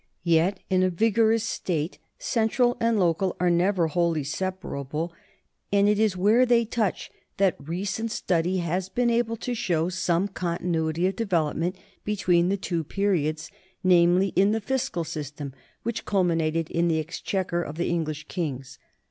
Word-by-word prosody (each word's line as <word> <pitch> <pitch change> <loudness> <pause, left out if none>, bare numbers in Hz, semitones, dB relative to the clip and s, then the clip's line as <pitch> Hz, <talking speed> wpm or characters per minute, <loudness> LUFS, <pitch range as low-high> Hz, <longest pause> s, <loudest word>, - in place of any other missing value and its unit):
Yet 170 +3 +2
in 185 -1 +2
a 185 - +3
vigorous 225 +4 +2
state 170 -6 -2 0.2
central 245 - +1
and 230 -2 +2
local 180 +1 +1
are 180 0 +3
never 180 +1 +2
wholly 165 -1 0
separable, 165 -1 -4 0.6
and 200 0 +4
it 210 0 +3
is 215 -4 +2
where 215 +7 +4
they 235 -2 +3
touch 220 -4 -2 0.3
that 190 -3 +3
re 165 +7 -4
cent 225 +3 -2
study 180 -2 0
has 180 +2 -2
been 240 +2 +1
able 230 -1 0
to 245 +2 -3
show 175 -8 0
some 185 0 0
continuity 170 -3 -1
of 190 - 0
development 175 -4 0 0.3
between 180 -4 +2
the 200 - +1
two 175 -3 -2
periods, 160 -4 -1 0.3
namely 180 +1 +4
in 195 +3 +3
the 225 - 0
fiscal 225 -6 -2
system 145 -3 -6 0.3
which 235 0 -3
culminated 165 -4 0
in 170 0 +1
the 165 -1 +2
exchequer 175 +2 -2
of 155 -2 -6
the 175 - 0
English 155 -3 -2
kings. 135 -7 -4
180 Hz, 155 wpm, -26 LUFS, 165-205 Hz, 0.6 s, and